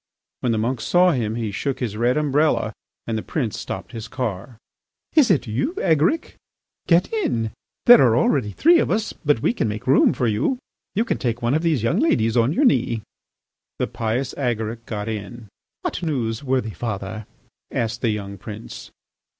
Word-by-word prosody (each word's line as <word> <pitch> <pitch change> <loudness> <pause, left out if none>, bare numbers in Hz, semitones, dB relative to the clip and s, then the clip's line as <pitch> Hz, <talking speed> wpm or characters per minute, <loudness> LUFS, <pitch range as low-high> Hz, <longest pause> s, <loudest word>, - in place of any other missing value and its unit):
When 125 - 0
the 115 - +1
monk 115 +2 -1
saw 180 +7 +4
him 115 -7 -1
he 115 -3 -2
shook 135 +7 -2
his 115 -5 -3
red 120 +4 +1
umbrella 150 +1 +1 0.3
and 115 - -2
the 110 - -1
prince 120 -6 -3
stopped - - -6
his 115 -1 -7
car. 120 -2 -4 0.6
"Is 290 -7 +5
it 180 -7 +3
you, 130 - -2
Agaric? 165 - +1 0.5
Get 175 - +3
in! 115 - 0 0.3
There 245 - +9
are 120 -3 +4
already 125 -4 +2
three 335 - +5
of - - 0
us, 215 -1 0
but 145 -6 0
we - - +3
can 180 - -1
make 105 +3 -4
room 135 - +5
for 125 - -1
you. 115 - +1 0.4
You 220 +4 +2
can - - -1
take 120 -2 -2
one 120 +2 +2
of 155 - +2
these 160 -9 +1
young 115 - +1
ladies 115 -8 +2
on 120 +2 +3
your 280 - +2
knee." 115 - +2 0.7
The - - 0
pious 115 +4 -2
Agaric 115 -3 -2
got 105 -1 -4
in. 110 +1 -6 0.3
"What - - -3
news, 125 -8 -2
worthy 130 -5 -1
father?" 105 -1 -5 0.4
asked 115 0 -2
the 120 - +1
young 100 -2 -4
prince. 105 +3 -9
120 Hz, 185 wpm, -22 LUFS, 110-150 Hz, 0.7 s, There